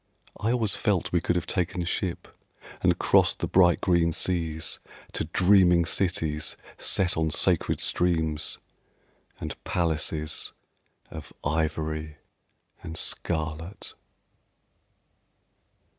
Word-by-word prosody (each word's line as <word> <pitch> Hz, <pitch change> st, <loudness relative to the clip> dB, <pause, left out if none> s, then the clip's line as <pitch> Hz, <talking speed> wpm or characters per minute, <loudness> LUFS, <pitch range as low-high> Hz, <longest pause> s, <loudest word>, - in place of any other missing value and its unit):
I 110 Hz, -, 0 dB
always 115 Hz, -6 st, +1 dB
felt 100 Hz, -6 st, 0 dB
we 85 Hz, -, +2 dB
could 85 Hz, -, 0 dB
have 90 Hz, 0 st, -1 dB
taken 90 Hz, -1 st, -1 dB
ship 90 Hz, 0 st, -3 dB, 0.5 s
And -, -, +3 dB
crossed -, -, +3 dB
the -, -, -2 dB
bright 90 Hz, -2 st, +4 dB
green 85 Hz, -2 st, +3 dB
seas 80 Hz, -3 st, -1 dB, 0.3 s
To -, -, -1 dB
dreaming 90 Hz, -3 st, +4 dB
cities 80 Hz, -4 st, 0 dB, 0.2 s
set 90 Hz, -2 st, +1 dB
on 80 Hz, -1 st, +1 dB
sacred 85 Hz, +2 st, +2 dB
streams 80 Hz, -4 st, 0 dB, 0.8 s
And -, -, -7 dB
palaces 80 Hz, -4 st, 0 dB, 0.6 s
Of -, -, -9 dB
ivory 80 Hz, 0 st, -2 dB, 0.6 s
and 80 Hz, 0 st, -7 dB
scarlet. 80 Hz, +4 st, -2 dB
85 Hz, 100 wpm, -26 LUFS, 80-90 Hz, 0.8 s, bright